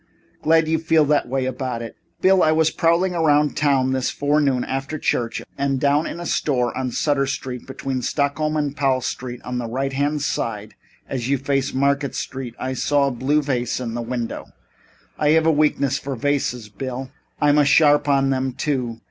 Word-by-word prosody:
Glad 160 0 +3
you 160 0 +1
feel 160 -1 +3
that 145 0 +2
way 130 +1 -1
about 130 -2 -3
it. 115 - -8 0.3
Bill, 190 0 +5
I 155 - +4
was 160 0 +3
prowling 170 +3 +2
around 150 -3 +2
town 135 -3 +2
this 130 -1 0
forenoon, 145 -3 +1
after 135 +3 -3
church, 120 -5 -1 0.2
and 135 -1 0
down 145 +3 +2
in - - -6
a 175 - -6
store 125 -7 0
on 130 -1 -2
Sutter 140 +2 0
Street, 130 -3 -5
between 135 -1 -4
Stockton 150 +4 0
and 145 -2 -1
Powell 135 -3 +1
Street, 125 0 -5
on 125 0 -3
the 120 - -3
right 135 +3 -2
hand 145 +2 0
side 105 -4 -3 0.3
as 125 -2 -3
you 140 - +2
face 135 0 -1
Market 140 +1 0
Street, 130 -3 -5
I 130 0 -3
saw 140 +2 +2
a - - -4
blue 140 +5 +1
vase 125 -4 -1
in 120 -2 -4
a 120 - -2
window. 120 0 -4 0.7
I 150 - +2
have 160 - +2
a 165 - +5
weakness 145 -3 +1
for 135 -1 -5
vases, 130 -3 -1
Bill. 130 +5 -6 0.3
I'm 150 0 +4
a - - +6
sharp 145 0 +4
on 135 -1 +3
them, 130 -1 -1
too. 125 -5 -2
135 Hz, 190 wpm, -22 LUFS, 130-150 Hz, 0.7 s, a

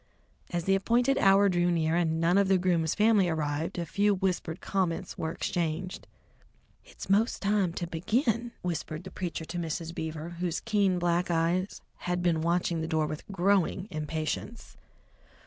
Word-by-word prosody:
As 175 -1 -2
the 195 - +2
appointed 240 +7 +2
hour 195 +1 +5
drew 175 -2 +2
near, 165 -1 +1
and 165 -2 +1
none 170 +4 +3
of 200 - +3
the 190 0 +4
groom's 175 -3 +1
family 210 -4 +4
arrived, 155 +2 -2
a 170 - -2
few 205 +5 +2
whispered 185 -3 -2
comments 185 -4 -2
were 160 - -3
exchanged. 175 +1 -3 0.8
"It's - - -11
'most 210 +4 +2
time 200 -3 +2
to 175 - -3
begin," 225 - 0
whispered 165 -2 -3
the 190 - -9
preacher 170 -3 -4
to 175 - -5
Mrs. 165 0 -4
Beaver, 160 0 -5
whose 175 -2 -1
keen 200 -5 +1
black 175 0 +1
eyes 170 +3 0 0.2
had 180 0 -2
been 165 -2 +2
watching 170 0 0
the 160 - -2
door 160 -2 +1
with 155 0 -6
growing 190 0 +1
impatience. 155 +8 -4
175 Hz, 165 wpm, -29 LUFS, 165-195 Hz, 0.8 s, hour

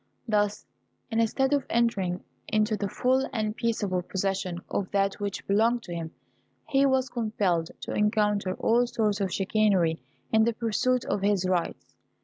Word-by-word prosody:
Thus, 210 -1 0 0.5
instead 230 +5 +1
of 285 -2 +2
entering 195 -6 0 0.2
into 215 0 +1
the 200 -1 -3
full 260 +6 +1
and 215 -2 -2
peaceable 210 -6 -1
possession 190 -1 -2
of 195 - -2
that 195 0 0
which 205 -1 -4
belonged 225 +4 +2
to 175 - -7
him, 165 -1 -5 0.6
he 275 0 +3
was 265 -1 +2
compelled 210 -9 0
to - - -5
encounter 210 -2 +1
all 240 +2 +2
sorts 210 -4 0
of 190 -2 0
chicanery 195 - +2 0.3
in 220 0 +5
the 235 - +1
pursuit 240 +3 0
of 200 - -1
his 200 -2 +2
rights. 180 -2 -2
210 Hz, 150 wpm, -27 LUFS, 195-230 Hz, 0.6 s, in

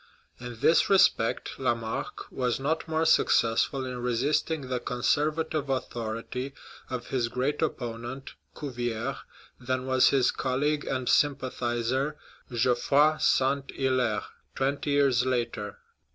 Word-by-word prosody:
In 120 -2 -8
this 165 - +4
respect 185 - +3
Lamarck 115 -4 -2
was 125 -1 -1
not 155 +5 -1
more 160 0 0
successful 130 -3 +3
in 125 -1 -5
resisting 140 +6 0
the 130 -1 -3
conservative 150 +4 0
authority 125 +1 -3 0.3
of 125 -2 -5
his 125 -3 0
great 130 +6 -1
opponent, 120 -2 -4 0.3
Cuvier, 120 -2 -3 0.4
than 130 0 -2
was 130 -1 +4
his 130 -3 +3
colleague 145 +3 -1
and 130 -2 -2
sympathizer, 130 0 0 0.3
Geoffrey 135 +6 +3
St. 135 +1 +2
''Hilaire, 130 -5 +1 0.3
twenty 140 +2 -1
years 140 -4 +3
later. 120 -5 -2
130 Hz, 110 wpm, -28 LUFS, 120-140 Hz, 0.4 s, this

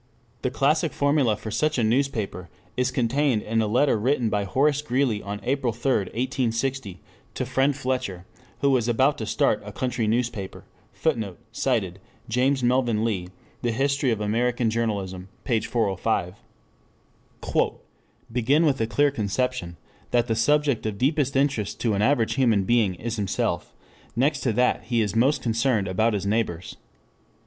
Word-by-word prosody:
The - - 0
classic 150 +5 +1
formula 140 -7 +2
for 110 0 -7
such 155 +7 0
a 120 - +2
newspaper 110 - -1 0.3
is 125 0 +1
contained 130 -1 +1
in 115 +1 0
a 110 - 0
letter 125 +2 +2
written 120 -1 +1
by 100 -1 0
Horace 145 +8 +2
Greeley 130 -6 0
on 100 +1 -5
April 135 -2 0
3, 120 +4 -1
1860, 120 -2 -2 0.4
to - - -2
"Friend 135 +1 +1
Fletcher" 125 -9 -3 0.4
who 140 - +3
was 125 -3 +2
about 130 +5 +2
to - - -4
start - - +1
a - - -8
country 120 -3 -2
newspaper: 110 -4 -2 0.3
[Footnote: 110 - -2
Cited, 110 -7 -1 0.3
James 130 +3 +1
Melvin 120 -3 +2
Lee, 95 -6 -1 0.3
The 120 - 0
History 140 +3 +1
of 115 -3 0
American 115 +2 0
Journalism, 100 -5 -2
p. 115 -4 +1
405.] 105 -5 -1 1.2
"I. - - +3 0.6
Begin 135 +7 +2
with 135 -5 +1
a 110 - +1
clear 145 +4 +2
conception 110 -6 -2 0.3
that 120 -1 +2
the 115 -2 -1
subject 145 +2 +2
of 105 -2 -4
deepest 140 +2 +1
interest 135 -7 0
to 115 -2 +1
an 100 - 0
average 115 -1 +2
human 115 -7 +3
being 105 -3 +2
is 115 +5 -4
himself; 100 -3 -1 0.4
next 140 +4 +2
to 125 -5 0
that 125 +3 +1
he 120 -2 0
is 105 -1 -1
most 130 +6 +2
concerned 115 -3 +1
about 110 +5 +1
his 100 -1 -2
neighbors. 100 -5 -1
120 Hz, 155 wpm, -25 LUFS, 105-135 Hz, 1.2 s, who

